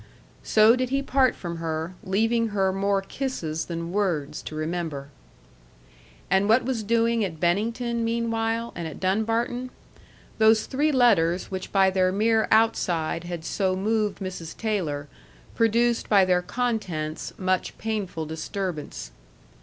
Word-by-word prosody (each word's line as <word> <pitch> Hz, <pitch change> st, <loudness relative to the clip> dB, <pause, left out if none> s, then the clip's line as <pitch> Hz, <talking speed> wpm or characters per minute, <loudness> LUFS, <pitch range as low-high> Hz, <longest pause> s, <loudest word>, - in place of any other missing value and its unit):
So 220 Hz, +2 st, +5 dB
did 255 Hz, -1 st, -1 dB
he 275 Hz, +1 st, 0 dB
part 265 Hz, -1 st, +2 dB
from 170 Hz, -2 st, -6 dB
her, 160 Hz, +1 st, -3 dB
leaving 225 Hz, +4 st, +1 dB
her 195 Hz, -3 st, 0 dB
more 195 Hz, 0 st, +1 dB
kisses 185 Hz, -, -3 dB
than 170 Hz, 0 st, -5 dB
words 180 Hz, -8 st, -1 dB
to 155 Hz, -, -8 dB
remember. 155 Hz, -3 st, -3 dB, 1.2 s
And 195 Hz, +2 st, +2 dB
what 230 Hz, +3 st, +4 dB
was 250 Hz, -3 st, -1 dB
doing 230 Hz, +1 st, +2 dB
at 165 Hz, -5 st, -4 dB
Bennington, 230 Hz, +7 st, 0 dB
meanwhile, 230 Hz, 0 st, -1 dB
and 170 Hz, -2 st, -4 dB
at 155 Hz, -, -8 dB
Dunbarton? 225 Hz, +6 st, 0 dB, 0.7 s
Those 220 Hz, 0 st, +5 dB
three 295 Hz, +3 st, +1 dB
letters 195 Hz, -, +3 dB
which 190 Hz, -1 st, -5 dB
by 190 Hz, -1 st, +4 dB
their 185 Hz, -1 st, +2 dB
mere 220 Hz, +3 st, +2 dB
outside 175 Hz, -7 st, +1 dB
had 175 Hz, -2 st, -6 dB
so 190 Hz, -2 st, 0 dB
moved 210 Hz, +1 st, 0 dB
Mrs. 185 Hz, -4 st, -6 dB
Taylor, 165 Hz, -10 st, -2 dB, 0.5 s
produced 230 Hz, +1 st, +2 dB
by 200 Hz, -3 st, +6 dB
their 180 Hz, -1 st, +2 dB
contents 180 Hz, -9 st, -3 dB
much 185 Hz, -1 st, -1 dB
painful 205 Hz, -7 st, -3 dB
disturbance. 160 Hz, -, -5 dB
200 Hz, 135 wpm, -25 LUFS, 175-230 Hz, 1.2 s, by